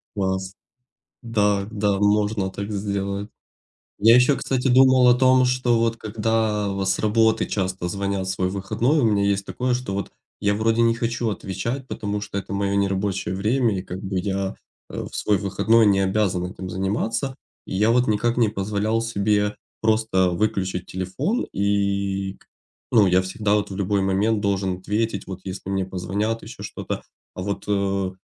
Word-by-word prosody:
Класс. 95 -1 -2 0.7
Да, 105 -4 +1
да, 105 -2 0
можно 105 -1 +1
так 100 +2 -6
сделать. 100 0 -3 0.7
Я 115 +3 +7
ещё, 125 +3 +4
кстати, 130 0 -1
думал 130 0 +6
о 120 - +7
том, 130 0 +4
что 125 -2 +2
вот 115 0 +1
когда 110 -1 0
вот 95 -1 -2
с 95 - +1
работы 110 +1 +2
часто 95 -2 -2
звонят 100 0 -2
в - - -2
свой 95 -1 0
выходной. 115 +9 0
У 140 - +3
меня 105 -3 +2
есть 100 0 +1
такое, 125 0 -1
что 125 -5 -3
вот 100 - -3 0.3
я 100 0 +2
вроде 115 +2 +2
не 115 0 +4
хочу 115 0 -1
отвечать, 105 +7 -4
потому 105 -3 -3
что 105 -1 -4
это 100 0 -6
мое 100 0 0
нерабочее 95 -1 0
время 110 0 +1
и - - -4
как 90 0 -7
бы 95 -1 -2
я 95 +1 -2 0.3
э - - -4
в - - -16
свой 105 -2 +1
выходной 110 +4 +3
не 100 -1 +4
обязан 95 -2 +1
этим 95 0 -7
заниматься. 110 +8 -2 0.3
И - - -4
я 105 +3 +3
вот 125 +1 +2
никак 110 +3 +1
не 120 -3 +3
позволял 105 +2 -1
себе 105 -2 0 0.3
просто 110 -4 +2
выключить 95 -1 -1
телефон, 130 - -2
и 100 -1 0
к - - -24 0.4
ну, 110 -4 +5
я 90 0 +4
всегда 100 +2 -1
вот 105 -1 0
в 95 - -5
любой 100 0 0
момент 100 +3 +1
должен 95 -2 0
ответить, 105 +1 -2
вот 95 -1 -7
если 95 0 -6
мне 95 -1 0
позвонят, 100 +5 -2
ещё - - -10
что-то. - - -5 0.3
А 90 - -5
вот, 100 +1 -3
э, 100 -2 0
100 Hz, 175 wpm, -23 LUFS, 95-115 Hz, 0.7 s, Я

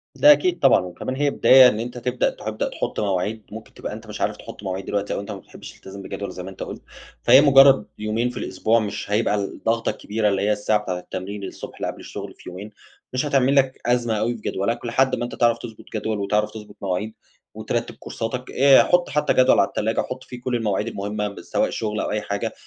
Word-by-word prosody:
ده 295 - +7
أكيد 355 +4 +3
طبعًا - - +5
وكمان 90 +8 -5
هي 145 +1 +1
بداية 130 -2 +7
إن 110 -3 0
أنت 120 +2 -5
تبدأ 125 +1 0
تبدأ 110 0 -4
تحُط - - -4
مواعيد، 105 +2 -1
ممكن 110 +1 -10
تبقى - - -6
أنت - - -10
مش - - -7
عارف - - 0
تحُط - - -11
مواعيد 95 0 -4
دلوقتي 100 0 -2
أو - - -2
أنت 100 - -6
ما - - -5
بتحبش - - -12
تلتزم 100 +1 -11
بجدول 100 0 -6
زي 90 0 -7
ما 95 - -7
أنت 95 - -7
قُلت. - - -8 0.4
فهي 130 +3 +8
مجرد 135 -5 +7
يومين 110 +3 -1
في 125 - -8
الأسبوع 115 +1 +1
مش 105 -1 -4
هيبقى 105 0 +2
الضغطة 115 +3 -1
كبيرة 105 0 -1
اللي 100 -1 0
هي 105 +1 +2
الساعة 105 0 +1
بتاعة 90 -2 -3
التمرين 100 +3 -6
الصبح 95 - -8
اللي - - -4
قبل - - -6
الشغل - - -8
في - - -12
يومين، 100 +4 -9 0.4
مش 130 +3 0
هتعمل 135 -1 +2
لك 135 -1 +2
أزمة 120 -1 +1
أوي 120 +2 0
في 110 - -11
جدولك 115 +5 -2
لحد 130 +3 +2
ما 120 - -4
أنت 120 - -7
تعرف 120 -1 +3
تضبط 115 -3 -10
جدول 110 0 -2
وتعرف 105 +1 0
تضبط 105 -2 -11
مواعيد 100 +3 -2 0.4
وترتب - - -3
كورساتك 125 +3 -5
آآ 135 0 +6
حُط 175 0 +2
حتى 150 - +1
جدول 130 0 +5
على 100 - +4
التلاجة، 110 +1 -1
حُط 130 0 -6
فيه 125 -2 -10
كل 125 0 -2
المواعيد 105 -2 -1
المهمة 105 0 -3
م 100 - -9
سواء - - 0
شغل 105 -1 -3
أو - - -2
أي 105 0 -1
حاجة، 105 +2 -3
110 Hz, 225 wpm, -22 LUFS, 105-125 Hz, 0.4 s, فهي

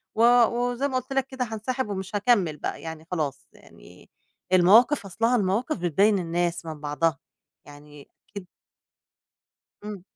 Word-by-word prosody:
و 225 - 0 0.2
وزي 245 +4 -1
ما 265 - -5
قُلت 270 - -9
لك 270 -1 0
كده 260 -1 -4
هانسحب 225 +2 -4
ومش 190 0 -5
هاكمّل 200 -8 +2
بقى - - -5
يعني 160 -1 -8
خلاص 155 -7 -3
يعني - - -18 0.4
المواقف 210 +8 +5
أصلها 225 +6 0
المواقف 215 +7 0
بتبيّن 195 +4 +2
الناس 170 0 -2
من 160 -2 -7
بعضها 150 0 -1 0.5
يعني 145 0 -15 0.2
أكيد 200 -3 -9 1.4
إمم. 210 -3 -7
195 Hz, 135 wpm, -25 LUFS, 165-235 Hz, 1.4 s, المواقف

